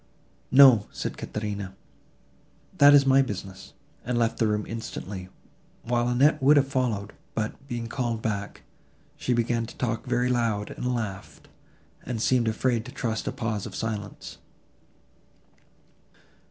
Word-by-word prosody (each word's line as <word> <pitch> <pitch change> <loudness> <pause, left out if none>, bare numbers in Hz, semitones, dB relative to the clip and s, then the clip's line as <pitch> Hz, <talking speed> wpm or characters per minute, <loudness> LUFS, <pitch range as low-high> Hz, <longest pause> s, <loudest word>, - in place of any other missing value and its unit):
"No," 130 -6 +7
said - - -4
Caterina, 100 -3 -5 1.0
"that 145 0 +9
is 140 -1 +6
my 135 0 +5
business," 95 -6 -6 0.3
and 125 0 -1
left 115 -1 0
the 115 - +3
room 105 0 0
instantly, 100 -4 -6 0.5
while 120 0 0
Annette 130 +5 +3
would 145 +3 +6
have 140 -1 +3
followed; 120 -7 -1 0.2
but, 115 +5 -4
being 120 -3 -4
called 115 -1 -2
back, 100 -2 -4 0.5
she - - -3
began 115 -1 0
to - - -12
talk 115 0 -2
very 125 0 +1
loud, 115 -4 0
and 125 0 -2
laugh, 100 -5 -5 0.6
and 125 -3 -4
seemed 120 +1 +2
afraid 115 +1 0
to 130 - -9
trust 115 -4 -3
a - - 0
pause 115 -6 -3
of - - -9
silence. 105 -2 -5
115 Hz, 140 wpm, -26 LUFS, 105-125 Hz, 1.0 s, that